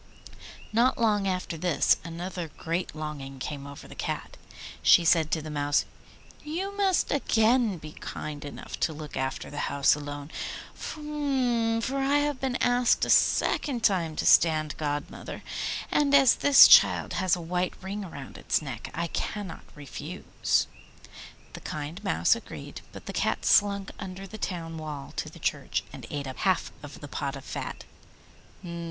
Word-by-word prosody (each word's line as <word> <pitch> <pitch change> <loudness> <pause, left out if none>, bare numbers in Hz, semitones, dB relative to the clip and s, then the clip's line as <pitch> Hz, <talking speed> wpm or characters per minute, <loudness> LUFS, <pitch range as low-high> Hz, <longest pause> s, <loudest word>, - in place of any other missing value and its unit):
Not 240 +4 +3
long 210 -4 +2
after 185 -3 -2
this 165 -3 +3
another 175 +1 -5
great 170 0 -3
longing 145 -3 -6
came 140 +1 -5
over 140 0 -10
the - - -11
Cat. - - -4 0.5
She 170 - +6
said 160 -1 +4
to 160 -2 -1
the 155 - -6
Mouse, 145 0 +1 0.6
'You 365 +7 -4
must 390 -3 +2
again 230 -5 +3
be 155 -1 -9
kind 150 -1 -6
enough 145 - -8
to 160 - +1
look 150 -1 -8
after 130 0 -3
the 145 - -2
house 140 -1 +4
alone, 145 0 -6 0.4
for 265 -5 -1
I 275 +1 +3
have 290 -2 0
been 265 -2 -1
asked 245 -1 +3
a - - +1
second 250 -6 +3
time 175 -7 +2
to - - -2
stand 155 -2 +4
godmother, 145 -1 -4 0.5
and 280 -1 +4
as 270 -3 +7
this 285 -1 +8
child - - +6
has 185 -1 +3
a - - -7
white 180 +2 -1
ring 195 +2 -5
round 140 -4 -9
its - - +1
neck, 135 -7 -6
I 170 - -1
cannot 190 +2 -4
refuse.' 145 -4 -2 0.9
The - - -9
kind 155 +6 -6
Mouse 200 - +3
agreed, - - -9
but - - -11
the - - -6
Cat - - 0
slunk 200 -1 +3
under 190 -1 -7
the 215 +2 -9
town 165 -4 -4
wall 150 -3 -7
to - - -2
the - - -14
church, - - -1
and - - -9
ate 145 -1 -4
up 130 -1 -6
half 190 -2 +1
of 145 -1 -10
the 145 - -7
pot 140 0 -3
of 135 - -10
fat. - - -5
175 Hz, 160 wpm, -28 LUFS, 150-230 Hz, 0.9 s, this